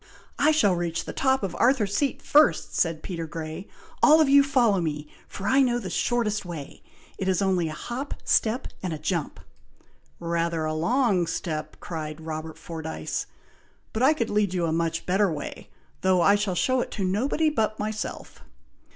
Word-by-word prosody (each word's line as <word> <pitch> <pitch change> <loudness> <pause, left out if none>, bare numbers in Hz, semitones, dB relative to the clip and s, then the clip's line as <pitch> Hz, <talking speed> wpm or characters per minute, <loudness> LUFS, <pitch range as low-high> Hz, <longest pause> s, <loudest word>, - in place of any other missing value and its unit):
"I 300 - +5
shall 300 -12 +4
reach 170 -1 -2
the - - -6
top 265 -3 +1
of 190 - -3
Arthur's 230 -6 +2
Seat 285 -2 0
first," 300 +1 +3
said 165 -2 0
Peter 165 -3 -4
Grey. 160 +3 -6 0.3
"All 310 +1 +7
of 310 - +5
you 280 +1 +7
follow 245 -9 +2
me, 150 -2 -3 0.2
for 200 - -8
I 270 +1 +4
know 245 -2 +2
the 205 -6 -5
shortest 230 -4 0
way. 165 -6 -8 0.4
It 190 - -2
is 190 -1 +2
only 185 -4 +1
a - - -5
hop, 250 - -5
step, 230 +3 +1
and 180 -3 -3
a - - -4
jump!" 155 0 -3 0.8
"Rather 170 -1 -1
a 155 - -1
long 195 - +1
step!" 155 -2 -4
cried 155 -2 -6
Robert 160 0 -6
Fordyce. 160 -1 -5 0.7
"But 220 - -2
I 285 +5 +5
could 230 -7 -2
lead 205 -3 +1
you 175 -2 +1
a 165 - 0
much 165 0 -1
better 190 +1 +2
way, 150 -2 -6 0.3
though 185 -1 +3
I 200 - +5
shall 205 -3 0
show 255 +6 +2
it - - -4
to 200 - -3
nobody 270 +11 +1
but 215 -6 0
myself." 215 0 -5
190 Hz, 180 wpm, -26 LUFS, 165-240 Hz, 0.8 s, All